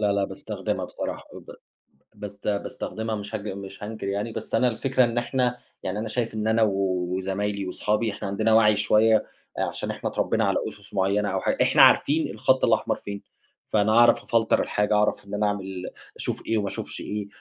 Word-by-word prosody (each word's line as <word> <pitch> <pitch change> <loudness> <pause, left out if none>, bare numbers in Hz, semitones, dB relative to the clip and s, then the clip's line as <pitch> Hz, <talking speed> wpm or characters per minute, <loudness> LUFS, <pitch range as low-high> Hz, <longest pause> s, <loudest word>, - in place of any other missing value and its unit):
لا 105 -1 +2
لا 100 -1 +1
باستخدمها - - -4
بصراحة، - - -5
وب - - -12 0.7
بس 100 -1 -8
باستخدمها 110 +1 -3
مش 105 +1 -5
هج 105 0 -5
مش 95 0 -7
هانكر 110 -1 -5
يعني، 100 +3 -2
بس 110 0 -4
أنا 125 +2 +3
الفكرة 130 +2 +1
إن 120 0 -1
إحنا 125 0 0 0.3
يعني 95 +3 -2
أنا 110 - -3
شايف 115 0 -2
إن 110 0 -2
أنا 110 0 +3
وزمايلي، 95 +1 -1
وصحابي 105 +3 0
إحنا 100 0 -6
عندنا 110 +3 +1
وَعي 105 -1 +6
شوية 105 +1 +4 0.4
آآ، - - +2
عشان - - -3
إحنا - - -4
اتربينا - - 0
على - - +1
أُسس 105 0 -15
معينة 100 +1 +1
أو 95 0 -1
حا - - +1
إحنا - - +5
عارفين 155 +2 +5
الخط 130 +5 +2
الأحمر - - +2
فين، 100 -1 -7 0.5
فأنا 105 0 +2
أعرف 120 +1 +5
أفلتر 115 -1 +2
الحاجة، 105 +1 0
أعرف 105 -1 +1
إن 100 - -9
أنا 105 0 +1
أعمل 95 -2 -4 0.3
أشوف - - -4
إيه 115 - +1
وما 100 -1 -1
اشوفش - - -5
إيه، 105 -1 -4
105 Hz, 190 wpm, -25 LUFS, 100-110 Hz, 0.7 s, وَعي